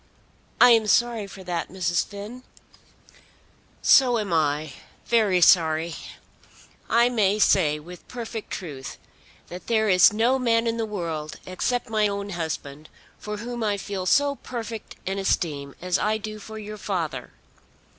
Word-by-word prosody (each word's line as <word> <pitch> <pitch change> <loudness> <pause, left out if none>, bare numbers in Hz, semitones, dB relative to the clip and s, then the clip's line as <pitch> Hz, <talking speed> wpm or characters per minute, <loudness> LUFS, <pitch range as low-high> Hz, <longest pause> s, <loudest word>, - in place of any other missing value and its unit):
"I 245 - +8
am 225 -2 +4
sorry 230 -2 +2
for 195 -1 -11
that, 175 -2 -3
Mrs. 175 -2 0
Finn." 210 +5 -9 1.4
"So 250 -3 +6
am 205 -5 -2
I, 150 -2 0 0.3
very 210 -6 +2
sorry. 165 -1 +4 1.0
I 235 +1 +4
may 210 -5 +2
say 165 -7 +3
with 175 +4 -12
perfect 230 -3 -6
truth 140 -7 -7 0.5
that 180 +1 -9
there 220 -2 +2
is 185 0 +6
no 235 +5 +2
man 230 -2 +2
in 230 0 -1
the 225 -1 -2
world, 165 -7 -4
except 240 +7 -2
my 215 -2 +2
own 200 0 -4
husband, 155 -3 -5 0.3
for 210 0 -5
whom 240 +2 -5
I 205 -2 0
feel 195 -2 -5
so 285 +3 +3
perfect 230 -3 -7
an 195 +1 -2
esteem 145 -7 -1
as 180 0 +1
I 215 +1 +1
do 215 0 -7
for 220 +1 -9
your 215 0 -7
father. 160 -11 -3
200 Hz, 145 wpm, -24 LUFS, 175-225 Hz, 1.4 s, I